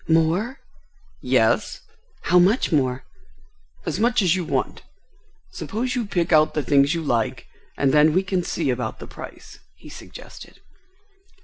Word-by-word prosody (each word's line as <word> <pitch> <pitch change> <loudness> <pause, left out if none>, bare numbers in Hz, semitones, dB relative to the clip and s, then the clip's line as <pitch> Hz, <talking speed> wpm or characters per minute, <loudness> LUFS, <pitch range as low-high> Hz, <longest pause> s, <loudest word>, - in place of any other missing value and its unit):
"More?" 165 +11 +1 0.6
"Yes." - - +1 0.4
"How 180 - +4
much 195 +7 +3
more?" 130 -4 0 0.8
"As - - -3
much 235 -1 +2
as 180 -1 +3
you 185 - -2
want. 135 -5 -2 0.7
Suppose 245 +4 -3
you 240 -4 -2
pick 175 -3 0
out 155 0 +4
the 150 - 0
things 140 +3 +3
you 165 - -3
like 115 -6 -1 0.3
and 135 -2 +2
then 150 +1 +5
we 185 +3 +2
can 185 -1 -1
see 160 -5 -1
about 125 -3 -3
the - - -9
price," - - -11 0.2
he - - -14
suggested. - - -12
165 Hz, 145 wpm, -22 LUFS, 140-190 Hz, 0.8 s, then